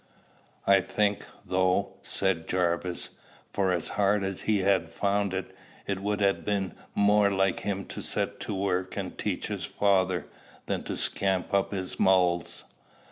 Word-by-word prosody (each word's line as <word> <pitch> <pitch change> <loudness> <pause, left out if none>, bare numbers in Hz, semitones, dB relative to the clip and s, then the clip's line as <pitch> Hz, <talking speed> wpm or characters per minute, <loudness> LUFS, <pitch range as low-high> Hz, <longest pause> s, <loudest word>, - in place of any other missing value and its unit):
"I 100 -1 +6
think, 105 +1 0 0.2
though," 95 0 +1
said 95 -4 0
Jarvis, 90 -1 0 0.4
"for 95 -2 +2
as 85 -3 -1
hard 100 0 +2
as 95 -1 -3
he'd 105 -3 +3
ha' 95 -4 +3
found 100 +2 0
it, 95 -1 -4 0.3
it 100 -1 -2
would 105 0 -1
ha' 100 -1 +2
been 100 -3 -1 0.2
more 105 0 +4
like 95 -1 +1
him 100 -1 -3
to - - -6
set - - -2
to 105 - -4
work 95 -1 -1
and - - -4
teach - - -2
his - - -3
father, 95 -3 +1 0.4
than - - -1
to - - -3
scamp 95 -2 +1
up 100 -1 +2
his 95 -2 -4
mulls." 90 -2 +2
95 Hz, 155 wpm, -28 LUFS, 95-100 Hz, 0.4 s, I